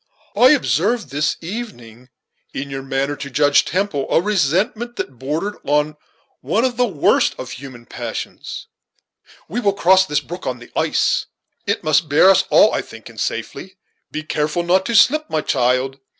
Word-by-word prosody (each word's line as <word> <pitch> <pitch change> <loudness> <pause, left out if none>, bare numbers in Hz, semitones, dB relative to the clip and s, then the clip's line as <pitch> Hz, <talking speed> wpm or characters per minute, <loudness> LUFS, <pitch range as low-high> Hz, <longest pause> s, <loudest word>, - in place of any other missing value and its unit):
I 250 - +6
observed 230 - +1
this 145 +2 0
evening, 130 - -8 0.5
in 140 0 -5
your 135 0 -4
manner 135 +1 -2
to 140 0 -7
Judge 145 +1 +3
Temple, 180 -7 -1
a - - +4
resentment 205 - 0
that 130 -3 -6
bordered 160 +10 -3
on 150 +1 +1 0.4
one 225 +4 0
of 250 -2 -1
the 245 +1 +2
worst 165 -9 +2
of 130 - -7
human 130 -3 -10
passions, - - -6 0.8
We 215 +8 -3
will 200 -5 +1
cross 190 0 +4
this 150 -1 +1
brook 170 +6 -8
on 125 -1 -2
the 120 - -15
ice; - - +1 0.4
it - - -1
must 155 0 +2
bear 160 +7 +6
us 195 - +3
all, - - +5
I - - 0
think, - - -12
in - - -12
safety. 190 0 -4 0.3
Be 155 - -4
careful 155 +2 -1
not 185 +2 +2
to 235 - -1
slip, 305 +8 +4
my 155 - 0
child." 130 0 0
155 Hz, 170 wpm, -19 LUFS, 135-200 Hz, 0.8 s, I